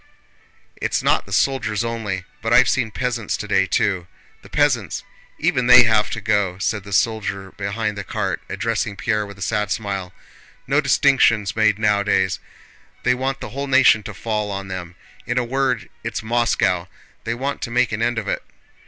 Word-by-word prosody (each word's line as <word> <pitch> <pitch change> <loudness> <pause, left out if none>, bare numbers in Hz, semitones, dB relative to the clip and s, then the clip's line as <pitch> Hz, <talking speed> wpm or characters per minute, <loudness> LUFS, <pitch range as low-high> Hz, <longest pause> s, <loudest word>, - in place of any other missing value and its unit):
"It's - - -1
not - - +2
the - - -12
soldiers 115 -1 +1
only, 110 -5 -3 0.2
but 115 - -2
I've 125 +2 +6
seen 120 -4 +1
peasants 120 -2 -2
today, 95 -2 +1
too.... 95 -4 0 0.3
The - - -15
peasants—even 125 -1 -1
they 125 0 +10
have 110 -2 +2
to - - -4
go," 100 -3 0
said 105 0 -1
the 100 - -11
soldier 100 -1 0
behind 105 +1 -3
the 100 - -5
cart, - - -2
addressing 115 -2 -2
Pierre 105 0 -1
with 100 -1 -11
a 95 - -5
sad 105 -2 -1
smile. 100 -4 -3 0.5
"No 140 +3 +2
distinctions 135 -7 +3
made 110 -2 +3
nowadays.... 100 -3 +1 0.6
They 125 - +3
want 135 +2 -2
the - - -5
whole 140 +2 -4
nation 135 -5 +5
to 105 0 -8
fall 105 -1 -2
on 95 -1 -5
them—in 95 +6 -7
a 125 - +3
word, 130 -1 -1 0.2
it's - - -4
Moscow! 110 -6 +1 0.4
They 115 - -1
want 135 +3 -3
to 120 - -3
make 125 0 +2
an 110 +1 -3
end 120 0 +1
of 110 -2 -3
it." - - -1
110 Hz, 170 wpm, -21 LUFS, 100-120 Hz, 0.6 s, they